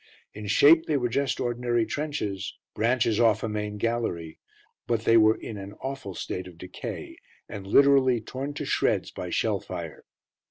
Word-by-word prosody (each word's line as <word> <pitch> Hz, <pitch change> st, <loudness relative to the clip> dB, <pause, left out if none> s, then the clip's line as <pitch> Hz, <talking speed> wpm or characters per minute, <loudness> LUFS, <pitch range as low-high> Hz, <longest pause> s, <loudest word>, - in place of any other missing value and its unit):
In 105 Hz, 0 st, -7 dB
shape 155 Hz, +10 st, +6 dB
they 150 Hz, -, +2 dB
were 125 Hz, -2 st, 0 dB
just 140 Hz, +3 st, 0 dB
ordinary 120 Hz, -1 st, 0 dB
trenches, 110 Hz, -12 st, -3 dB, 0.2 s
branches 115 Hz, -1 st, +1 dB
off 115 Hz, -2 st, +3 dB
a -, -, 0 dB
main 105 Hz, -1 st, -3 dB
gallery, 105 Hz, -8 st, -2 dB, 0.5 s
but 115 Hz, -2 st, +1 dB
they 115 Hz, -, +4 dB
were 110 Hz, -1 st, +6 dB
in 110 Hz, -, -7 dB
an 100 Hz, +1 st, -8 dB
awful 130 Hz, -6 st, -6 dB
state 90 Hz, +2 st, -5 dB
of 90 Hz, -2 st, -13 dB
decay, 90 Hz, +2 st, -7 dB, 0.3 s
and 95 Hz, -1 st, -8 dB
literally 135 Hz, +1 st, +5 dB
torn 135 Hz, +6 st, -6 dB
to -, -, -4 dB
shreds -, -, +1 dB
by -, -, -6 dB
shell -, -, 0 dB
fire. -, -, -7 dB
115 Hz, 165 wpm, -26 LUFS, 105-130 Hz, 0.5 s, shape